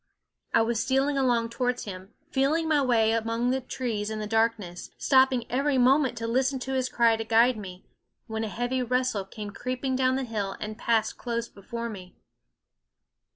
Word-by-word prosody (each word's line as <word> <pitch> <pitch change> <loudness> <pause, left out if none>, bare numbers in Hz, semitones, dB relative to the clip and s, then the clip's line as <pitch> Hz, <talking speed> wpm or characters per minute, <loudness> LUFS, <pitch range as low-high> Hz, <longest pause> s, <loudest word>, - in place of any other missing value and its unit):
I - - +4
was 230 -1 0
stealing 270 +2 +1
along 240 -4 +2
towards 250 +1 -1
him, 190 0 -9 0.2
feeling 300 +5 +1
my 305 -2 +3
way 230 -4 +3
among 230 +2 0
the 265 0 0
trees 230 -4 -3
in 220 - -4
the 215 - -3
darkness, 220 -5 -1
stopping 260 -3 +3
every 275 +2 +1
moment 260 0 +3
to 230 0 -3
listen 265 +3 +1
to 265 +1 -3
his 260 -1 0
cry 230 -1 +3
to 225 - -3
guide 230 +3 +4
me, 190 -3 -9 0.4
when 220 -1 -3
a 220 - -3
heavy 245 +5 -1
rustle 250 -5 0
came 205 +1 -7
creeping 255 +4 -3
down 260 0 +2
the 265 - -1
hill 210 -5 -3
and 215 +1 -6
passed 230 -2 +1
close 235 -1 -2
before 235 +3 -6
me. 185 -5 -9
235 Hz, 180 wpm, -27 LUFS, 220-260 Hz, 0.4 s, I